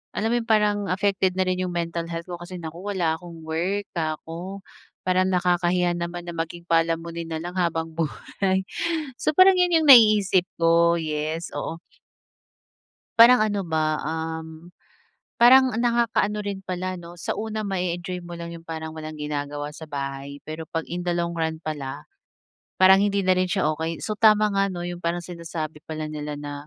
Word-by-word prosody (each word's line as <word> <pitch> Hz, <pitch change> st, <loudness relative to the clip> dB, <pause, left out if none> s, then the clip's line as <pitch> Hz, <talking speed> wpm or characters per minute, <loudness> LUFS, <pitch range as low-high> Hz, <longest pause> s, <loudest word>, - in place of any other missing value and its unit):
alam 220 Hz, -, 0 dB
mo -, -, +2 dB
'yon, -, -, -4 dB
parang 210 Hz, -2 st, +2 dB
affected 190 Hz, -1 st, +1 dB
na -, -, +4 dB
rin 185 Hz, 0 st, 0 dB
yung 180 Hz, -, -3 dB
mental 170 Hz, 0 st, -2 dB
health 170 Hz, +1 st, -5 dB
ko 175 Hz, -, -5 dB
kasi, 175 Hz, +1 st, -8 dB
"Naku, 165 Hz, +1 st, -7 dB
wala 170 Hz, -4 st, +1 dB
akong 170 Hz, -2 st, -11 dB
work." 180 Hz, +6 st, -1 dB
'ka 155 Hz, -2 st, -1 dB
ko. 180 Hz, +4 st, -6 dB, 0.5 s
Parang 185 Hz, 0 st, +3 dB
nakakahiya 180 Hz, -1 st, +2 dB
naman 175 Hz, 0 st, -5 dB
na -, -, -5 dB
maging 165 Hz, +1 st, -4 dB
palamunin 165 Hz, 0 st, 0 dB
nalang 170 Hz, +3 st, -4 dB
habang 165 Hz, -2 st, 0 dB
buhay. 170 Hz, -, -1 dB, 0.6 s
So, 305 Hz, -, 0 dB
parang 375 Hz, 0 st, +7 dB
'yun 345 Hz, -3 st, +4 dB
yung 300 Hz, -, 0 dB
naiisip 210 Hz, -6 st, +7 dB
ko. 170 Hz, 0 st, +4 dB
Yes, 155 Hz, +1 st, -3 dB
oo. 165 Hz, +1 st, -5 dB, 1.4 s
Parang 240 Hz, +2 st, +8 dB
ano 205 Hz, -2 st, +1 dB
ba, 155 Hz, -1 st, 0 dB
um, 160 Hz, +1 st, -5 dB, 0.7 s
parang 255 Hz, 0 st, +7 dB
nakakaano 235 Hz, -3 st, +1 dB
rin 195 Hz, -1 st, -4 dB
pala 185 Hz, 0 st, -3 dB
'no, 175 Hz, 0 st, -11 dB
sa -, -, -2 dB
una 220 Hz, 0 st, -3 dB
ma-e-enjoy 180 Hz, -1 st, -2 dB
mo 175 Hz, -, -9 dB
lang 170 Hz, 0 st, -6 dB
yung 165 Hz, -, -11 dB
parang 160 Hz, 0 st, -5 dB
walang 155 Hz, -1 st, -7 dB
ginagawa 145 Hz, 0 st, -4 dB
sa 160 Hz, -, -9 dB
bahay, 140 Hz, 0 st, -4 dB, 0.2 s
pero 155 Hz, +1 st, -5 dB
'pag 165 Hz, -1 st, -1 dB
in 180 Hz, -, -3 dB
the 175 Hz, -, 0 dB
long 170 Hz, 0 st, -1 dB
run 160 Hz, -1 st, -2 dB
pala, 145 Hz, -4 st, -5 dB, 0.7 s
parang 190 Hz, +1 st, +7 dB
hindi 200 Hz, -1 st, +1 dB
na 185 Hz, -, +5 dB
rin 185 Hz, 0 st, +1 dB
siya 190 Hz, -, +1 dB
okey. 160 Hz, +1 st, -4 dB
So, 215 Hz, -, -2 dB
tama 215 Hz, -1 st, +5 dB
nga, 195 Hz, 0 st, +2 dB
'no, 175 Hz, -2 st, -5 dB
yung 175 Hz, 0 st, -6 dB
parang 170 Hz, +1 st, -2 dB
sinasabi 165 Hz, -3 st, -6 dB
pala 155 Hz, 0 st, -4 dB
nila 150 Hz, -1 st, -5 dB
na, 145 Hz, 0 st, -6 dB
175 Hz, 175 wpm, -24 LUFS, 160-190 Hz, 1.4 s, Parang